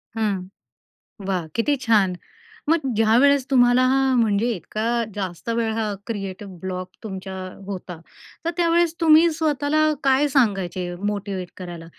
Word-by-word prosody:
हं, 215 -3 0 0.9
वा! 185 -4 -1
किती 260 +6 +2
छान! 205 -5 +3 0.6
मग 330 +1 +4 0.2
ज्यावेळेस 250 +6 +4
तुम्हाला 245 -1 +5
हा 270 0 +2
म्हणजे 225 -1 +2
इतका 200 +5 -5 0.3
जास्त 190 0 -5
वेळ 230 -1 0
हा 220 -2 -1
क्रिएटिव 200 -3 -5
ब्लॉक 185 -1 -4
तुमच्या 190 -2 -6 0.3
होता 180 -4 -6 0.5
तर - - +1
त्यावेळेस 340 -1 +3
तुम्ही 325 +1 +6
स्वतःला 305 -1 0 0.2
काय 270 +2 +4
सांगायचे 195 - 0
मोटिव्हेट 200 -3 -3
करायला 175 -3 -8
220 Hz, 125 wpm, -23 LUFS, 190-270 Hz, 0.9 s, तुम्ही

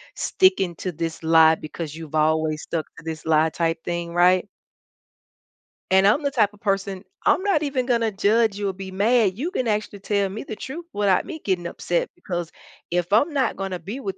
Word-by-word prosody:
sticking 285 - +2
to 185 - -4
this 165 0 -4
lie 160 0 +6
because 155 0 -7
you've 160 -2 -8
always 155 0 +1
stuck 160 -2 -3
to - - -12
this 160 -1 -6
lie 160 0 +3
type 165 0 -1
thing, 170 -1 -3
right? 180 +1 +4 1.5
And 190 +1 +5
I'm 215 +9 +4
the 280 - 0
type 215 -7 +2
of 205 - -19
person 195 -2 -2 0.2
I'm - - +4
not 390 -7 +2
even 270 -4 -1
gonna 230 -3 +1
judge 210 +1 +2
you 205 -1 -1
or - - -3
be 190 0 -8
mad, 205 0 +2
you 315 +9 -3
can 255 -11 -1
actually 210 -1 -2
tell 200 0 0
me 205 +3 -6
the 220 - -6
truth 300 +10 -7
without 200 -3 +2
me 315 - -7
getting 185 -3 -1
upset 175 0 -2
because 175 -2 -5 0.4
if 175 +1 -1
I'm 285 +10 +4
not 275 -2 +1
gonna 195 -2 -4
be 200 +10 -6
with 195 -4 -4
195 Hz, 200 wpm, -23 LUFS, 170-220 Hz, 1.5 s, lie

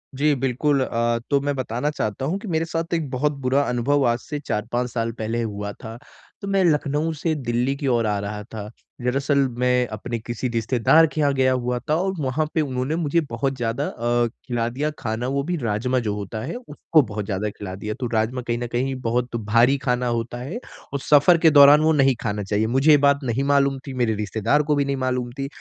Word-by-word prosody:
जी, 150 +2 +2
बिल्कुल 135 +2 +1
अ, 115 -1 0
तो 140 - +3
मैं 145 0 -1
बताना 125 +2 -2
चाहता 110 -2 -3
हूँ 170 +7 -1
कि 210 - -9
मेरे 165 -2 0
साथ 165 +1 -3
एक 160 -4 -1
बहुत 145 +4 +1
बुरा 130 +2 +2
अनुभव 135 +4 +1
आज 120 0 +1
से 145 +4 -6
4-5 120 -1 -2
साल 115 -1 -1
पहले 115 +1 -3
हुआ 105 -2 -4
था। 115 0 -7 0.4
तो 200 - -5
मैं 195 -1 +2
लखनऊ 150 0 +1
से 160 +1 0
दिल्ली 125 0 -1
की 140 0 -4
ओर 120 -3 +2
आ 105 -1 0
रहा 105 +1 -5
था। 105 -1 -8 0.3
दरअसल, 135 +3 0 0.2
मैं 125 0 +2
अपने 115 +3 -4
किसी 120 +2 -4
रिश्तेदार 120 +7 +3
के - - -3
यहाँ 140 -1 +3
गया 130 -1 +2
हुआ 125 -1 -1
था 155 - +3
और 190 0 -1
वहाँ 145 +2 0
पे 160 - +2
उन्होंने 130 +1 -2
मुझे 165 0 +1
बहुत 130 +4 -2
ज़्यादा 115 -1 -1
अ, 120 +1 0 0.2
खिला 120 -2 -1
दिया 140 +5 -2
खाना, 115 +2 -3
वो 140 +1 -1
भी 175 +3 -2
राजमा 125 0 0
जो 105 - 0
होता 105 +2 -5
है, - - -5
उसको 165 - +1
बहुत 105 -4 -5
ज़्यादा 105 +1 -2
खिला 100 -2 -8
दिया। 105 +2 -4
तो 125 - -2
राजमा 115 +3 0
कहीं 120 -1 -2
न 120 0 -3
कहीं 130 +2 -1
बहुत 120 +1 -1
भारी 120 +5 +3
खाना 125 -2 -1
होता 120 0 -2
है 140 - -5 0.3
और 140 - -1
सफ़र 150 +5 +5
के 160 0 +5
दौरान 145 +1 +8
वो 160 - +3
नहीं 135 -3 +3
खाना 105 0 -2
चाहिए। 105 +3 0
मुझे 135 +6 +3
ये 150 - +8
बात 140 0 +3
नहीं 130 +2 -1
मालूम 140 -1 +2
थी, 135 - -5
मेरे 120 -3 +1
रिश्तेदार 110 +7 0
को 150 0 +1
भी 140 -1 +1
नहीं 140 0 -1
मालूम 125 -2 -2
थी। 135 - -2
125 Hz, 225 wpm, -23 LUFS, 115-145 Hz, 0.4 s, दौरान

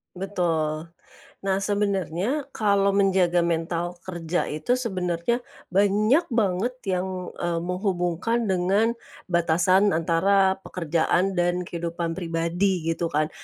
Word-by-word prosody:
Betul. 165 -5 -1 0.6
Nah, 195 0 +1
sebenernya 200 - 0
kalau 200 -4 +2
menjaga 185 -3 +3
mental 170 +1 -1
kerja 175 -1 -2
itu 155 +12 0
sebenernya 185 -2 -1 0.3
banyak 205 - +3
banget 215 +3 +1
yang, 185 -1 -2
eee, 170 -1 -1
menghubungkan 180 +4 -1
dengan 190 +5 +2 0.4
batasan 180 +4 +3
antara 190 +4 +3
pekerjaan 175 +2 0
dan 175 +1 +1
kehidupan 170 -1 -4
pribadi 170 +2 0
gitu 165 +1 -1
kan. 155 0 0
180 Hz, 105 wpm, -25 LUFS, 170-200 Hz, 0.6 s, menjaga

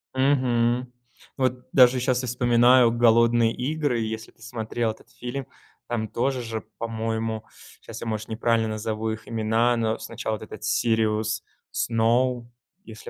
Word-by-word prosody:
Мгм. 125 -2 +2 0.5
Вот 130 -1 -1
даже 125 -1 +6
сейчас 125 0 +1
я - - -3
вспоминаю 120 0 +5
"Голодные 115 0 +4
игры", 140 -2 -1
если 110 0 -4
ты - - -29
смотрел 115 0 -2
этот 110 - -15
фильм. 125 +3 -5 0.4
Там 110 -2 -2
тоже 130 +3 -1
же, 115 -1 -5
по-моему 110 -1 -3 0.4
сейчас - - -9
я, 115 - -5
может, 110 -1 -3
неправильно 115 0 +1
назову 110 0 -3
их 110 0 -7
имена, 115 +2 +1
но 110 0 0
сначала 110 -1 -4
этот 110 0 -10
Сириус 110 0 +1 0.3
Сноу, 120 +1 +1 0.4
если 110 -1 -10
115 Hz, 140 wpm, -25 LUFS, 110-125 Hz, 0.5 s, даже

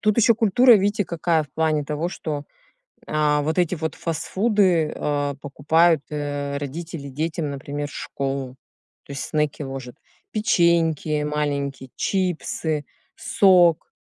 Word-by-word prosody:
тут 215 0 +2
еще 230 0 +5
культура, 235 +3 +5
видите, 205 0 +1
какая, 165 -1 0
в 145 - -14
плане 155 -1 0
того, 155 +4 -2
что, 150 -5 -5 0.6
а, 150 -1 +1
вот 160 +4 -1
эти 175 0 +2
вот 160 0 -3
фастфуды, 180 0 +1
а, 145 -1 -1
покупают, 155 +3 +2
э, 145 -1 -3
родители 145 +1 -6
детям, 155 +2 -3
например, 145 +1 -5
в - - -13
школу, 135 -2 -4 0.5
то 140 - -10
есть 140 - -4
снеки 150 -1 -1
ложат: 135 -2 -7 0.4
печеньки 170 -7 +2
маленькие, 140 -3 -2
чипсы, 165 -5 -1 0.3
сок. 180 -4 +4
155 Hz, 130 wpm, -23 LUFS, 145-175 Hz, 0.6 s, еще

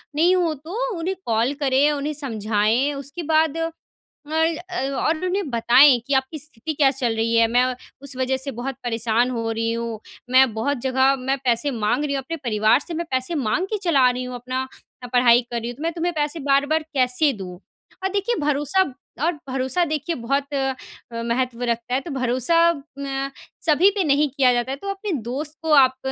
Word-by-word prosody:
नहीं 345 +5 +4
हो 345 -3 +1
तो 390 - -4
उन्हें 365 +4 -2
कॉल 230 +4 +1
करें, 280 +1 +3
उन्हें 295 +1 -2
समझाएँ 225 0 0
उसके 280 +5 -6
बाद 315 0 +3
अ 330 0 -1 0.6
अ, 320 -1 -1
और 315 +5 0
उन्हें 365 -3 -1
बताएँ 245 +3 +6
कि 280 - 0
आपकी 265 +3 0
स्थिति 300 0 -6
क्या 280 -2 +4
चल 250 -4 -1
रही 225 +1 0
है 230 0 +5
मैं 245 +2 +3 0.4
उस 280 -1 -5
वज़ह 260 0 0
से 270 +1 -4
बहुत 260 +2 -5
परेशान 235 0 +1
हो 230 -2 -2
रही 225 0 -1
हूँ, 230 -1 -4 0.3
मैं 260 -2 +5
बहुत 270 +6 -1
जगह 265 +1 +3
मैं 265 +1 -1
पैसे 255 +3 +1
माँग 235 +3 0
रही 290 -1 -1
हूँ। 275 - 0
अपने 330 +5 -4
परिवार 220 -6 +2
से 335 - -7
मैं 340 +1 -3
पैसे 260 +6 -1
माँग 280 - 0
के - - +1
चला 275 -8 +4
रही 250 +1 -3
हूँ, 250 0 -6
अपना 255 +2 -4 0.5
पढ़ाई 245 -1 +6
कर 235 - -1
रही 235 +1 -5
हूँ 240 - -7
तो 300 - -7
मैं 330 - 0
तुम्हें 345 +1 -2
पैसे 300 +1 -2
बार-बार 285 +2 +2
कैसे 255 +2 +3
दूँ? 185 -4 -8 0.4
और 380 - +1
देखिए 410 +4 0
भरोसा 295 +5 +2 0.4
और 340 - +3 0.2
भरोसा 260 +6 0
देखिए 310 +1 -2
बहुत 275 +4 -2
अ, 270 -1 0 0.4
महत्व 235 +1 -2
रखता 235 0 -2
है 260 - +3
तो 330 - -8
भरोसा 255 +4 +1 0.4
न 275 -1 -3 0.4
सभी 330 +5 +5
पे - - +3
नहीं 295 -1 +2
किया 260 -2 +3
जाता 240 +2 -1
है 270 - -3
तो 395 - -5
अपने 395 +1 -5 0.2
दोस्त 295 +4 -5
को 320 -1 -2
आप 260 -2 +5
270 Hz, 200 wpm, -22 LUFS, 245-310 Hz, 0.6 s, बताएँ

